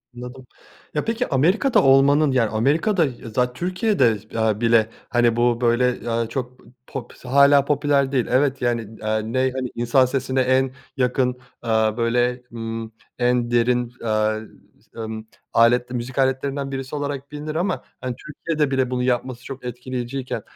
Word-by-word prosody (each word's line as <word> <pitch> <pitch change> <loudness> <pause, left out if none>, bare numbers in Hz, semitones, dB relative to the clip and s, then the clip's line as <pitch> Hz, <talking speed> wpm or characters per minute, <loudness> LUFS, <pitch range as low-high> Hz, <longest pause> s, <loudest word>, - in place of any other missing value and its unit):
Anladım. 125 +1 -9 0.5
Ya 150 - -1
peki 230 +2 -1
Amerika'da 180 - +3
olmanın 140 +2 +5
yani 115 -4 +2
Amerika'da 155 - +2
ya 120 -3 -7
zat 125 0 +1
Türkiye'de, 180 - +1 0.2
aaa, 110 -1 +1
bile 115 -1 +4 0.2
hani 120 -1 +3
bu 120 0 +2
böyle, 120 0 +1
aaa, 115 0 0
çok, 125 0 -6
eee, - - -18 0.2
pop 135 - -7
hâlâ 140 +2 +5
popüler 140 -1 +1
değil. 130 -4 +1
Evet 135 +1 +2
yani, 115 -3 -2
aaa, 110 0 +1
ney 130 +4 0
hani 130 -1 -3
insan 120 +2 +3
sesine 130 0 -1
en 130 +1 +2 0.3
yakın, 125 0 +1 0.2
aaa, 110 -1 +1
böyle, 120 +1 +1
ımm, 115 -1 -5 0.3
en 120 -1 +1
derin, 120 0 +1
aaa, 110 -1 +1 0.6
ımm, 110 -1 -6 0.3
aletli 120 +2 +3
müzik 125 +2 -5
aletlerinden 135 +1 0
birisi 135 +2 -5
olarak 145 -1 -4
bilinir 150 +1 -5
ama 170 -7 -1 0.2
hani 125 -1 -3
Türkiye'de 150 +1 -2
bile 130 -2 +1
bunu 125 0 -1
yapması 125 0 -1
çok 135 -2 -8
etkileyiciyken 125 +1 -4
125 Hz, 150 wpm, -22 LUFS, 120-135 Hz, 0.6 s, olmanın